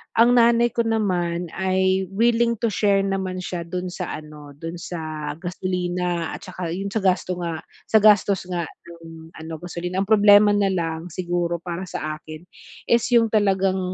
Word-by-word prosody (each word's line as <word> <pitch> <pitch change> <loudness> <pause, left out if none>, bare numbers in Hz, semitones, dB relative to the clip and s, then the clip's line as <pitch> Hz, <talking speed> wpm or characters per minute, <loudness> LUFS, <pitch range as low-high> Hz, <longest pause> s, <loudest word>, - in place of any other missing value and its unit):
ang 240 +2 +5
nanay 235 0 +5
ko 235 - +2
naman 180 -6 -1
ay 190 0 +1
willing 235 +2 +2
to 235 - +1
share 200 -1 +2
naman 190 -1 -2
siya 180 -1 -4
dun 180 +1 -4
sa 175 - -5
ano, 150 -1 -12
dun 165 +3 -7
sa 155 -3 -5
gasolina 180 -1 -2
at - - -11
tsaka 185 -2 -6
yun 195 +2 -3
sa 220 - 0
gasto 185 -1 +1
nga 165 -2 -4 0.3
sa - - -2
gastos 205 -2 +4
nga 175 -2 -2 0.2
nung 165 -1 -12
ano, 160 0 -7
gasolina. 180 +1 -3
Ang 200 - -10
problema 205 0 +7
na 205 -1 +2
lang 165 -1 -3
siguro 175 0 -2
para 180 +1 -5
sa 155 -2 -4
akin 155 +1 -10 0.5
is 235 -1 +4
yung 230 -2 +4
talagang 195 -3 +2
185 Hz, 170 wpm, -23 LUFS, 170-205 Hz, 0.5 s, problema